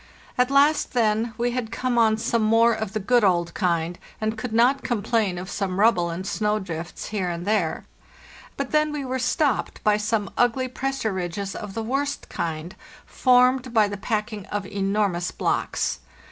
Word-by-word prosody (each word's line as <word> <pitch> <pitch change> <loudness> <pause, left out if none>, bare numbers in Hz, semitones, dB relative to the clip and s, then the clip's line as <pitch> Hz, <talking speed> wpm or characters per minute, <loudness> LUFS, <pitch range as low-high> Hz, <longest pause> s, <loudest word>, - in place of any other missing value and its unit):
At 250 0 +2
last, 285 +3 +3
then, 225 -1 +1
we 240 0 0
had 240 -3 -3
come 245 0 0
on 220 -1 +4
some 230 +1 0
more 225 +2 +4
of 220 -2 -4
the 215 - -1
good 240 +4 +3
old 175 -3 +2
kind, 170 -2 -1 0.2
and 220 +1 -1
could 225 +2 -5
not 245 +5 +3
complain 220 -4 0
of 180 +1 -6
some 195 -2 -3
rubble 195 -6 +4
and 170 +3 -5
snow 210 +1 0
drifts 175 -4 -6
here 200 -4 -2
and 170 0 -4
there; 200 -6 0 0.7
but 275 -2 -3
then 305 0 +2
we 295 -2 -4
were 260 0 -2
stopped 255 +3 0
by 210 -1 +4
some 210 -1 -1
ugly 245 +2 +2
pressure 265 -4 -2
ridges 190 +2 -4
of 210 -1 -7
the 225 - -2
worst 275 +5 -2
kind, 165 +2 -4 0.3
formed 250 -1 +3
by 215 -2 +5
the 205 - -4
packing 210 0 -3
of 205 -1 -3
enormous 195 -3 0
blocks. - - -1
220 Hz, 175 wpm, -24 LUFS, 195-245 Hz, 0.7 s, by